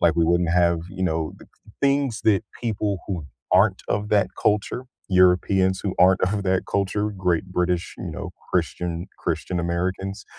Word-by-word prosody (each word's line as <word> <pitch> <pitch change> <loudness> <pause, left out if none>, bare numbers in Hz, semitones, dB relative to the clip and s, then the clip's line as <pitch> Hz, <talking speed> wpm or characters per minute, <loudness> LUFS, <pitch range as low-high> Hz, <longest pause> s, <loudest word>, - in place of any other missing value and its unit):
like, 85 0 +3
we 85 - +4
wouldn't 85 0 +2
have, 85 -1 +3
you 95 -1 -3
know, 80 -2 -1
the - - -14
c - - -28 0.3
things 140 -4 +2
that 100 -4 +4 0.2
people 105 -4 -1
who 90 -6 -3 0.3
aren't 95 +1 +4
of 105 +1 -1
that 100 -3 +3
culture, 105 +4 0 0.2
Europeans 95 0 +3
who 100 - -1
aren't 95 +1 +5
of 100 +2 0
that 95 -1 +2
culture, 100 +2 0
great 90 -4 0
British, 90 -1 -1
you - - -5
know, - - -6 0.2
Christian 85 +1 -1
Christian 85 +2 -2
Americans, 90 +3 -2
95 Hz, 170 wpm, -24 LUFS, 85-100 Hz, 0.3 s, aren't